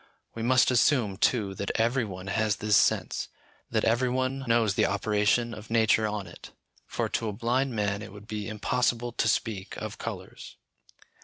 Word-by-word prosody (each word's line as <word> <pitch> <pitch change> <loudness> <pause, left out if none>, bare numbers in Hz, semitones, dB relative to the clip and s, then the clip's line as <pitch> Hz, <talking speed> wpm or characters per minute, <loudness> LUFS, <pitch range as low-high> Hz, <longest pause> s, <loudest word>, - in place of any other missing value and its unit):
We 115 - -6
must 125 +2 +4
assume, 120 -5 +2
too, 105 -2 +1
that 100 +1 -4
every 120 +2 +2
one 95 -2 -8
has 105 +1 0
this 105 -1 +1
sense, - - +2 0.4
that - - 0
every 120 +3 +2
one 130 +2 -1
knows 115 -3 +3
the - - +2
operation 105 +3 +1
of 105 0 -10
nature 110 -1 +3
on 105 -2 -3
it, 85 - -12 0.4
for - - -2
to 115 - -1
a - - -4
blind 125 +4 0
man 100 -1 -1
it 105 - -8
would 105 0 -12
be 105 -1 -4
impossible 120 +2 0
to 115 - 0
speak 110 -4 -1
of - - -6
colours. - - -7
110 Hz, 175 wpm, -28 LUFS, 105-120 Hz, 0.4 s, must